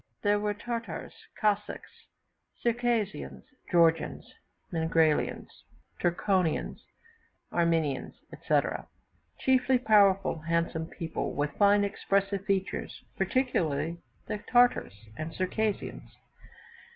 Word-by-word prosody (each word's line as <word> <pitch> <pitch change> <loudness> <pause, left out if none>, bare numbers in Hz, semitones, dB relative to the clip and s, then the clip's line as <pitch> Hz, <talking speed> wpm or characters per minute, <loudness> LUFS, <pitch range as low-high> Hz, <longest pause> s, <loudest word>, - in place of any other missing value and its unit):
There 205 0 +3
were 210 0 -1
Tartars, 230 +2 -5 0.3
Cossacks, 210 -1 -1 0.7
Circassians, 225 - -1 0.3
Georgians, 165 -2 +2 0.4
Mingrelians, 160 -2 +1 0.4
Turkonians, 175 -1 0 0.7
Armenians, 165 -5 0 0.2
etc.; - - 0 0.5
chiefly 260 0 +3
powerful, 200 -7 +4
handsome 165 0 -1
people, 165 -1 -4
with 145 +1 0
fine 205 0 +5
expressive 200 -1 0
features 195 -2 -2
particularly 170 - 0 0.3
the 210 - -4
Tartars 245 - +3 0.2
and 155 +1 -5
Circassians. 205 +3 -2
195 Hz, 80 wpm, -29 LUFS, 165-210 Hz, 0.7 s, fine